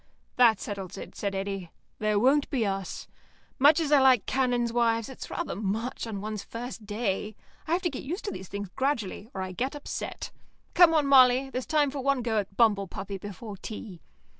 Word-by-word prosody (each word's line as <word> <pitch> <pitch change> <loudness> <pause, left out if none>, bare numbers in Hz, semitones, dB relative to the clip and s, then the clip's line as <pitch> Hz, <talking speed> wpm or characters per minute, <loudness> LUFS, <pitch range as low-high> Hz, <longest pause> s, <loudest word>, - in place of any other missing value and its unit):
"That 235 -4 +5
settles 195 -2 -6
it," - - -9
said 200 -1 -3
Eddy. 195 -2 -3 0.3
"There 215 -1 +1
won't 270 +6 +3
be 245 -5 0
us. 195 -2 -4 0.5
Much 290 +4 +6
as 310 -3 -1
I 290 -2 +6
like 260 -5 +5
canons' 245 -3 +1
wives, 230 -1 +1
it's 265 - -8
rather - - -3
much 220 +5 -3
on 205 -3 -5
one's 215 -1 -4
very 230 +1 -6
first 220 -5 -10
day. 210 -1 -2 0.3
I 320 - 0
have 365 +3 +1
to 350 - +2
get 260 - -5
used 345 +9 -5
to 410 - -2
these 190 - -7
things 200 -1 -5
gradually, 230 -4 -2
or 190 - -2
I 185 - -5
get 260 +10 -3
upset. 290 - -5 0.4
Come 345 -2 +7
on, 300 -2 +3
Molly, 265 -1 +6
there's 255 -3 -4
time 295 -3 +2
for 280 - -5
one 275 -1 +1
go 225 -2 +1
at 195 -1 -6
bumble 205 -4 +3
puppy 195 +2 -6
before 205 +1 -8
tea." 205 -4 -8
230 Hz, 205 wpm, -28 LUFS, 200-265 Hz, 0.5 s, Come